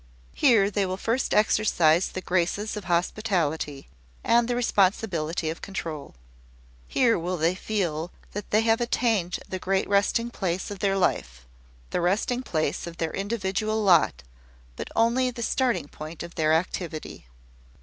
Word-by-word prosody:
Here 205 Hz, -, +4 dB
they 200 Hz, 0 st, +1 dB
will 185 Hz, 0 st, -3 dB
first 230 Hz, +6 st, -1 dB
exercise 185 Hz, -6 st, +3 dB
the 185 Hz, -, -6 dB
graces 185 Hz, +5 st, -1 dB
of 210 Hz, -3 st, -6 dB
hospitality, 170 Hz, -5 st, -1 dB, 0.4 s
and 235 Hz, 0 st, +3 dB
the 245 Hz, -, 0 dB
responsibility 185 Hz, -8 st, +1 dB
of 165 Hz, -, -8 dB
control. 160 Hz, -, -6 dB, 0.7 s
Here 235 Hz, -7 st, +3 dB
will 180 Hz, +2 st, -2 dB
they 165 Hz, +2 st, +2 dB
feel 180 Hz, -5 st, -2 dB, 0.2 s
that 205 Hz, 0 st, -6 dB
they 215 Hz, -, +3 dB
have 225 Hz, +1 st, +2 dB
attained 225 Hz, -7 st, +1 dB
the 185 Hz, -, -4 dB
great 190 Hz, +1 st, 0 dB
resting 205 Hz, +4 st, +1 dB
place 185 Hz, -2 st, -2 dB
of 200 Hz, -, -6 dB
their 195 Hz, 0 st, +1 dB
life 60 Hz, -, -1 dB, 0.5 s
the -, -, 0 dB
resting 210 Hz, +8 st, +1 dB
place 155 Hz, -, -2 dB
of 170 Hz, 0 st, -8 dB
their 165 Hz, -2 st, -2 dB
individual 215 Hz, +1 st, -1 dB
lot, 165 Hz, -, +4 dB, 0.5 s
but -, -, -6 dB
only 235 Hz, +3 st, +3 dB
the 235 Hz, -1 st, -5 dB
starting 250 Hz, -, 0 dB
point 155 Hz, +3 st, -8 dB
of 170 Hz, 0 st, -9 dB
their 155 Hz, -1 st, +1 dB
activity. 160 Hz, -, -2 dB
190 Hz, 150 wpm, -26 LUFS, 170-220 Hz, 0.7 s, Here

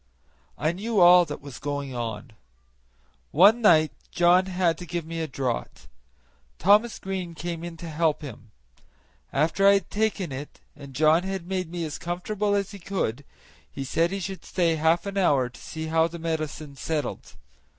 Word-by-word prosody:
I 155 Hz, +2 st, +1 dB
knew 210 Hz, +4 st, -1 dB
all 175 Hz, 0 st, +8 dB
that 150 Hz, -2 st, -7 dB
was 140 Hz, -3 st, -9 dB
going 145 Hz, -2 st, -4 dB
on. 115 Hz, -1 st, -5 dB, 1.0 s
One 205 Hz, +9 st, +6 dB
night 155 Hz, -8 st, +5 dB, 0.2 s
John 180 Hz, +2 st, +4 dB
had 180 Hz, -3 st, +1 dB
to 180 Hz, -, -8 dB
give 170 Hz, -2 st, -3 dB
me 165 Hz, 0 st, -4 dB
a 160 Hz, -, -2 dB
draught; 130 Hz, -, -4 dB, 0.7 s
Thomas 210 Hz, +6 st, +4 dB
Green 185 Hz, -3 st, -5 dB
came 170 Hz, 0 st, -5 dB
in 170 Hz, -1 st, -7 dB
to 170 Hz, -, -8 dB
help 160 Hz, -1 st, 0 dB
him. 115 Hz, -5 st, -9 dB, 0.8 s
After 165 Hz, +7 st, +2 dB
I 200 Hz, -, +8 dB
had 195 Hz, -4 st, -2 dB
taken 205 Hz, -6 st, -1 dB
it 135 Hz, +3 st, -8 dB, 0.2 s
and 140 Hz, -2 st, -12 dB
John 155 Hz, +4 st, +4 dB
had 190 Hz, -1 st, -4 dB
made 185 Hz, -2 st, -2 dB
me 170 Hz, -1 st, -4 dB
as 155 Hz, -, -6 dB
comfortable 200 Hz, +4 st, -1 dB
as 200 Hz, 0 st, -1 dB
he 200 Hz, -, -9 dB
could, 170 Hz, -, -3 dB, 0.5 s
he 135 Hz, -, -5 dB
said 165 Hz, +5 st, +1 dB
he 195 Hz, +2 st, -3 dB
should 190 Hz, 0 st, -6 dB
stay 170 Hz, -3 st, +1 dB
half 160 Hz, +3 st, +2 dB
an 200 Hz, 0 st, -2 dB
hour 140 Hz, -9 st, +3 dB
to 120 Hz, -, -15 dB
see 160 Hz, 0 st, -6 dB
how 160 Hz, +1 st, +2 dB
the 170 Hz, +1 st, -8 dB
medicine 155 Hz, -3 st, -4 dB
settled. 155 Hz, +1 st, -4 dB
165 Hz, 175 wpm, -25 LUFS, 150-185 Hz, 1.0 s, all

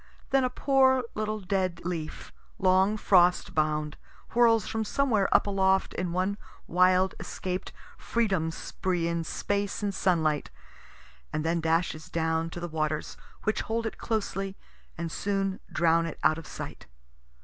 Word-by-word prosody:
Then 270 Hz, 0 st, +4 dB
a 255 Hz, -, +2 dB
poor 260 Hz, 0 st, +3 dB
little 215 Hz, 0 st, -2 dB
dead 185 Hz, -2 st, -1 dB
leaf, 165 Hz, -3 st, -5 dB, 0.2 s
long 190 Hz, +3 st, +3 dB
frost 180 Hz, -3 st, +4 dB
bound, 150 Hz, -1 st, 0 dB, 0.3 s
whirls 230 Hz, -3 st, +4 dB
from 220 Hz, 0 st, -1 dB
somewhere 220 Hz, -3 st, +1 dB
up -, -, +5 dB
aloft 190 Hz, -1 st, +2 dB
in 180 Hz, -1 st, -2 dB
one 185 Hz, +4 st, -1 dB, 0.3 s
wild 185 Hz, +2 st, +3 dB
escaped 185 Hz, 0 st, -4 dB, 0.3 s
freedom 195 Hz, -9 st, 0 dB
spree 175 Hz, +1 st, -2 dB
in 170 Hz, 0 st, -1 dB
space 200 Hz, +5 st, -2 dB
and 200 Hz, -1 st, 0 dB
sunlight, 160 Hz, -6 st, +1 dB, 0.8 s
and 155 Hz, +1 st, -2 dB
then 165 Hz, +1 st, +1 dB
dashes 160 Hz, -1 st, 0 dB
down 160 Hz, 0 st, 0 dB
to 175 Hz, -, -7 dB
the 175 Hz, -, -4 dB
waters, 155 Hz, -1 st, -2 dB, 0.3 s
which 215 Hz, -, 0 dB
hold 230 Hz, +1 st, -2 dB
it 225 Hz, -, -4 dB
closely 195 Hz, -3 st, -2 dB, 0.4 s
and 165 Hz, 0 st, -3 dB
soon 195 Hz, 0 st, -1 dB
drown 165 Hz, 0 st, +3 dB
it 165 Hz, -, -6 dB
out 155 Hz, +3 st, +4 dB
of 165 Hz, -, -11 dB
sight. -, -, -8 dB
185 Hz, 145 wpm, -28 LUFS, 165-205 Hz, 0.8 s, up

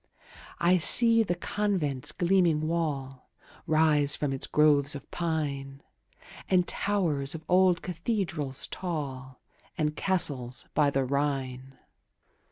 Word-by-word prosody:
I 180 Hz, +2 st, +2 dB
see 230 Hz, +6 st, +6 dB
the 175 Hz, -5 st, -1 dB
convent's 175 Hz, -8 st, -2 dB
gleaming 170 Hz, -4 st, +1 dB
wall 140 Hz, -6 st, -4 dB, 0.4 s
Rise 155 Hz, -2 st, +3 dB
from 145 Hz, -2 st, -2 dB
its 135 Hz, -, -3 dB
groves 145 Hz, -1 st, +3 dB
of 140 Hz, -, -11 dB
pine, 140 Hz, -5 st, -4 dB, 0.7 s
And 180 Hz, -2 st, +2 dB
towers 165 Hz, -9 st, -1 dB
of 160 Hz, -, -9 dB
old 180 Hz, -1 st, +3 dB
cathedrals 170 Hz, -, -3 dB
tall, 135 Hz, -7 st, -6 dB, 0.4 s
And 150 Hz, -1 st, -1 dB
castles 140 Hz, -11 st, -1 dB
by 145 Hz, -1 st, +2 dB
the 135 Hz, -1 st, -1 dB
Rhine. 135 Hz, -1 st, -3 dB
150 Hz, 110 wpm, -27 LUFS, 135-175 Hz, 0.7 s, see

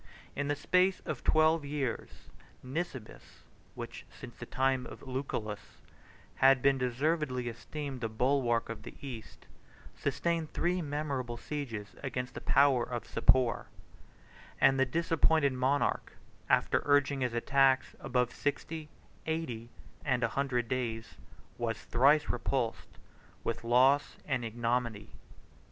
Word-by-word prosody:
In 145 Hz, 0 st, -1 dB
the 145 Hz, -, +1 dB
space 185 Hz, +5 st, +2 dB
of 150 Hz, -5 st, -5 dB
twelve 155 Hz, 0 st, +4 dB
years, 140 Hz, -4 st, -4 dB, 0.3 s
Nisibis, 130 Hz, -3 st, -6 dB, 0.3 s
which, -, -, -7 dB
since -, -, -11 dB
the -, -, -9 dB
time 130 Hz, -1 st, +1 dB
of -, -, -11 dB
Lucullus, 130 Hz, -6 st, -4 dB, 0.6 s
had 135 Hz, 0 st, +6 dB
been 135 Hz, -1 st, +4 dB
deservedly 130 Hz, 0 st, 0 dB
esteemed 135 Hz, +3 st, -6 dB
the 115 Hz, -, -1 dB
bulwark 120 Hz, 0 st, +1 dB
of 115 Hz, -1 st, -6 dB
the -, -, -10 dB
East, 125 Hz, -6 st, -9 dB, 0.5 s
sustained 155 Hz, +3 st, -1 dB
three 180 Hz, +1 st, +1 dB
memorable 140 Hz, -5 st, -3 dB
sieges 115 Hz, -8 st, -5 dB
against 125 Hz, -2 st, -3 dB
the -, -, -7 dB
power 135 Hz, -2 st, +4 dB
of 120 Hz, 0 st, -4 dB
Sapor; 120 Hz, +1 st, +3 dB, 0.9 s
and 135 Hz, 0 st, +5 dB
the 135 Hz, -, +4 dB
disappointed 160 Hz, -1 st, +2 dB
monarch, 130 Hz, +3 st, 0 dB, 0.4 s
after -, -, +3 dB
urging 145 Hz, -1 st, +3 dB
his 125 Hz, -2 st, 0 dB
attacks 135 Hz, +1 st, +3 dB
above 125 Hz, -1 st, 0 dB
sixty, 155 Hz, +2 st, -3 dB, 0.4 s
eighty, 125 Hz, -8 st, -3 dB, 0.3 s
and 130 Hz, -4 st, +1 dB
a 115 Hz, -, +2 dB
hundred 125 Hz, -2 st, 0 dB
days, 115 Hz, -2 st, -3 dB, 0.5 s
was 115 Hz, -1 st, -1 dB
thrice 140 Hz, +5 st, +4 dB
repulsed 120 Hz, -1 st, -2 dB, 0.5 s
with 115 Hz, 0 st, -2 dB
loss 130 Hz, +5 st, +4 dB
and 135 Hz, -4 st, -1 dB
ignominy. 115 Hz, -2 st, -2 dB
130 Hz, 125 wpm, -31 LUFS, 120-145 Hz, 0.9 s, had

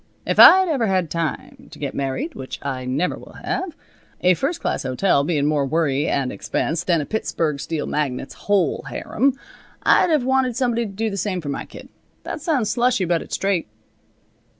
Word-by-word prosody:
If -, -, -1 dB
I'd 375 Hz, 0 st, +9 dB
ever 270 Hz, -9 st, +1 dB
had 185 Hz, -4 st, 0 dB
time 165 Hz, -3 st, -4 dB
to -, -, -13 dB
get -, -, -4 dB
married, 140 Hz, -, -3 dB
which 130 Hz, -, -7 dB
I 130 Hz, -2 st, -3 dB
never 140 Hz, +8 st, -1 dB
will -, -, -14 dB
have, 355 Hz, -4 st, -3 dB, 0.4 s
a 180 Hz, 0 st, +5 dB
first 295 Hz, -, -2 dB
class -, -, -2 dB
hotel 140 Hz, +3 st, +1 dB
bein' 145 Hz, -2 st, 0 dB
more 150 Hz, -1 st, +2 dB
worry 145 Hz, 0 st, 0 dB
and 135 Hz, -2 st, 0 dB
expense 105 Hz, -, -2 dB
than 170 Hz, -3 st, +2 dB
a -, -, -4 dB
Pittsburg 160 Hz, -8 st, -2 dB
steel 155 Hz, +1 st, -3 dB
magnate's 135 Hz, -3 st, -2 dB, 0.2 s
whole 195 Hz, -4 st, +2 dB
harem, 270 Hz, +3 st, 0 dB, 0.5 s
I'd -, -, +4 dB
have 305 Hz, -5 st, +2 dB
wanted 265 Hz, -2 st, +1 dB
somebody 235 Hz, -2 st, 0 dB
to -, -, -9 dB
do 220 Hz, +2 st, -2 dB
the 200 Hz, -, -4 dB
same 190 Hz, -1 st, -1 dB
for 150 Hz, -4 st, -6 dB
my 140 Hz, -, -4 dB
kid. -, -, -12 dB, 0.4 s
That -, -, -5 dB
sounds 275 Hz, -, 0 dB
slushy, 245 Hz, -5 st, +2 dB
but 170 Hz, -1 st, +1 dB
it's -, -, -5 dB
straight." 195 Hz, -, 0 dB
180 Hz, 190 wpm, -22 LUFS, 145-240 Hz, 0.5 s, I'd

